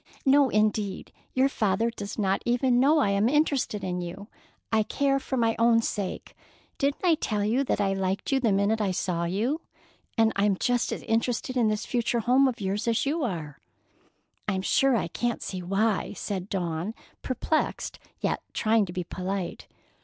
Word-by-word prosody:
"No, 275 0 +5
indeed! 210 -2 0 0.2
Your 260 +1 +4
father 225 -2 0
does 205 -3 -7
not 195 -2 +1
even 245 +1 +2
know 290 +5 +5
I 235 -10 +3
am 200 +4 +2
interested 280 -8 +1
in 180 -1 -2
you. 185 +5 -7 0.4
I 220 - +5
care 275 +5 +1
for 265 0 -3
my 230 -2 +2
own 230 0 +4
sake. 200 -4 -4 0.4
Didn't 280 +5 0
I 345 - +6
tell 215 -9 -1
you 240 +6 +2
that - - 0
I 195 -1 +2
liked 195 +3 -2
you 270 - +3
the 235 -5 +2
minute 200 +3 +2
I 205 - +1
saw 175 -1 -1
you? 225 - -1 0.6
And 225 -1 +4
I'm 200 -1 +2
just 245 +2 +1
as - - -4
interested 230 +3 -1
in 240 -3 +3
this 215 0 -1
future 235 -1 0
home 255 +4 +4
of 250 -3 -2
yours 200 +3 -2
as 230 +2 +1
you 300 +3 0
are." 160 - -4 0.9
"I'm 190 -2 -1
sure 270 +5 +3
I 195 - 0
can't 240 +7 -2
see 185 -1 -4
why," 195 +3 0
said 195 0 -4
Dawn, 175 +2 -2 0.3
perplexed, 285 +5 -1 0.2
yet - - 0
trying 220 -2 +2
to 175 - -7
be 180 -1 -2
polite. 185 +1 -4
220 Hz, 180 wpm, -27 LUFS, 195-250 Hz, 0.9 s, I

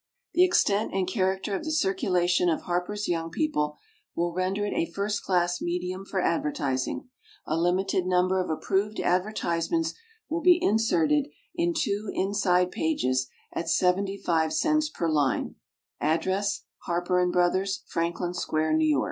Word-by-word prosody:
The 360 - +5
extent 220 - +2
and 190 -2 +1
character 190 0 0
of - - -4
the 315 - -4
circulation 190 - +2
of 160 - 0
HARPER'S 180 +4 -2
YOUNG 165 -1 -1
PEOPLE 150 - -1 0.4
will 170 0 -1
render 185 +3 -1
it 205 - -2
a 165 - 0
first 205 +3 -2
class 175 -1 +1
medium 180 +2 -3
for 195 - -2
advertising. 145 - -1 0.4
A 155 - -1
limited 180 +2 +1
number 185 +1 +2
of - - -7
approved 195 +6 -1
advertisements 185 - 0 0.3
will 330 +1 -2
be 355 0 +6
inserted 295 - +2 0.3
on 340 0 +2
two 205 -7 -1
inside 185 -2 +2
pages 130 -5 0 0.2
at 170 - -3
75 180 -3 +1
cents 305 -1 +2
per 170 - -2
line. 145 -4 +1 0.5
Address 190 +6 0 0.2
HARPER 175 +1 +1
& - - -1
BROTHERS, 185 +3 +1
Franklin 170 +1 -2
Square, 155 -3 -1
N. 155 - +3
Y. 155 -3 +3
185 Hz, 145 wpm, -27 LUFS, 170-205 Hz, 0.5 s, be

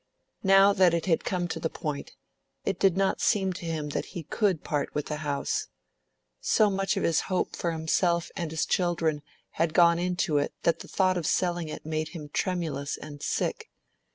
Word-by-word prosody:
Now 195 +1 +6
that 185 -4 +4
it 165 - -1
had 165 -4 +2
come 180 -2 -1
to - - -3
the 160 - -1
point, 150 -3 -5 0.5
it - - -1
did 190 -2 +3
not 195 0 +1
seem 190 -2 +2
to 175 - -8
him 155 -2 -2
that - - -3
he 170 - -4
could 190 +1 0
part 145 -2 -2
with 150 - -1
the 150 - -3
house. 145 -2 -2 0.7
So 210 -2 +3
much 195 0 0
of - - 0
his 165 -1 +3
hope 185 - 0
for 170 - -1
himself 170 +1 +1
and 170 -2 -3
his 160 0 -1
children 170 -4 0 0.4
had 165 -1 +1
gone 170 -1 +6
into 175 -4 +1
it 145 - -2
that 170 -1 +2
the - - -9
thought 185 -2 +2
of 160 - -3
selling 175 -2 0
it - - -7
made 155 0 -2
him 150 -2 -8
tremulous 155 -5 -2
and 145 -1 -10
sick. - - -2
170 Hz, 195 wpm, -28 LUFS, 155-185 Hz, 0.7 s, Now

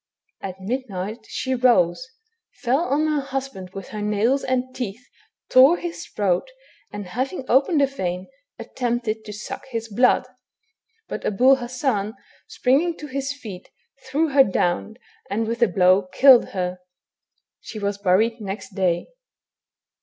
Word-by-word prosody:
At 190 -1 -6
midnight 220 -1 -4
she 260 - -2
rose, 240 -4 +3 0.6
fell 250 +3 +2
on 300 -1 +1
her 305 -2 +1
husband 270 -8 -5
with 195 -2 -7
her 210 - -5
nails 210 +6 +1
and 255 0 -1
teeth, 245 -2 -5 0.4
tore 270 +7 +7
his 345 0 -6
throat, 195 - 0 0.4
and 205 -1 -6
having 260 - -3
opened 280 +4 +3
a - - +6
vein, 185 -9 -4 0.3
attempted 235 -3 -2
to 210 - -7
suck 210 +5 -7
his 230 -2 -4
blood; 245 +4 +3 0.8
but - - -5
Abul 255 +6 +4
Hassan 240 -4 -2 0.3
springing 305 +7 +1
to 300 - -8
his 275 0 -3
feet 215 -10 -9 0.4
threw 305 +4 +1
her 275 -1 +6
down, 190 0 -1 0.3
and 215 +3 -1
with 230 +2 -3
a 235 - +6
blow 185 +1 +3
killed 260 +1 +7
her. 180 -1 -3 0.8
She 220 - -9
was 200 -1 -2
buried 215 +4 +2
next 200 0 -6
day. 180 -3 0
235 Hz, 140 wpm, -23 LUFS, 195-265 Hz, 0.8 s, tore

